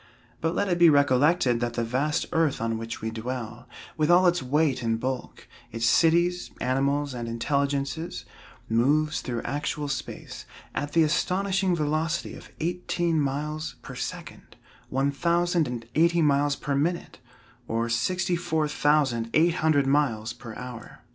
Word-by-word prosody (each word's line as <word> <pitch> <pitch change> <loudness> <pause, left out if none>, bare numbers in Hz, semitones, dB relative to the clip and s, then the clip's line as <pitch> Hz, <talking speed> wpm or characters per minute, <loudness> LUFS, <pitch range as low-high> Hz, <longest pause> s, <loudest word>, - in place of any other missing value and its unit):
But 165 +1 0
let 200 - +1
it 175 -2 0
be 170 -1 +8
recollected 140 -2 +3
that 120 0 -2
the 120 - 0
vast 135 +6 0
earth 160 -4 +1
on 115 0 -1
which 115 0 -6
we 110 - -2
dwell, 120 0 -6 0.3
with 155 -1 +1
all 180 +2 +6
its 175 -2 +3
weight 140 0 +1
and 115 -1 0
bulk, 130 +1 -5 0.2
its 115 0 -2
cities, 170 +6 +3
animals 140 +2 0
and 120 -1 -5
intelligences, 140 +5 -2 0.4
moves 150 +7 +2
through 120 -2 -4
actual 145 +1 -3
space, 135 - -6 0.3
at 145 0 -3
the 165 - +5
astonishing 185 +4 +1
velocity 155 +2 -1
of - - -12
eighteen 170 -1 -1
miles 150 +3 -3
per - - -8
second, - - -7 0.3
one 135 +2 +1
thousand 170 +2 +1
and 120 -2 -5
eighty 170 +1 +3
miles 145 0 +2
per 140 +1 -3
minute, 160 +3 -1 0.5
or 115 +1 -1
sixty 175 +11 0
four 160 -3 0
thousand 145 -6 +1
eight 165 +2 +4
hundred 155 -3 +3
miles 135 -6 +1
per 120 -3 -10
hour. 125 -2 -9
145 Hz, 150 wpm, -26 LUFS, 125-165 Hz, 0.5 s, be